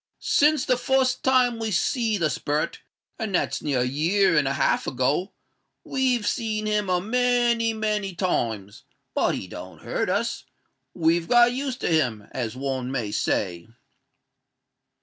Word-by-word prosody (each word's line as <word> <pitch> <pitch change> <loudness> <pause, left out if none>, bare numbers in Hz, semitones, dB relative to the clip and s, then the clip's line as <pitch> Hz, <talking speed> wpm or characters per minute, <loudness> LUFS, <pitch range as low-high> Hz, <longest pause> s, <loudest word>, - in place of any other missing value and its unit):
"Since 300 -1 +3
the 255 - +2
fust 265 0 +1
time 250 -3 +3
we 225 -1 -2
see 220 +3 +1
the 160 -5 +1
sperret—and 155 - -4
that's - - 0
near 140 -4 0
a - - +1
year 165 +8 +2
and 150 -3 +3
a 135 - 0
half 140 - +1
ago—we've 205 - -2
seen 215 0 -1
him 210 -2 0
a 180 -1 +2
many, 240 +1 +2
many 210 -3 -2
times; 110 - -2 0.3
but - - +1
he - - -5
don't - - -10
hurt - - -2
us—we've 165 +1 -2
got 240 0 +5
used 260 -1 -4
to - - -1
him, 125 -11 0
as 120 -3 -4
one 130 -1 -3
may 120 -6 -2
say." 90 -4 -1
195 Hz, 140 wpm, -24 LUFS, -, 0.3 s, got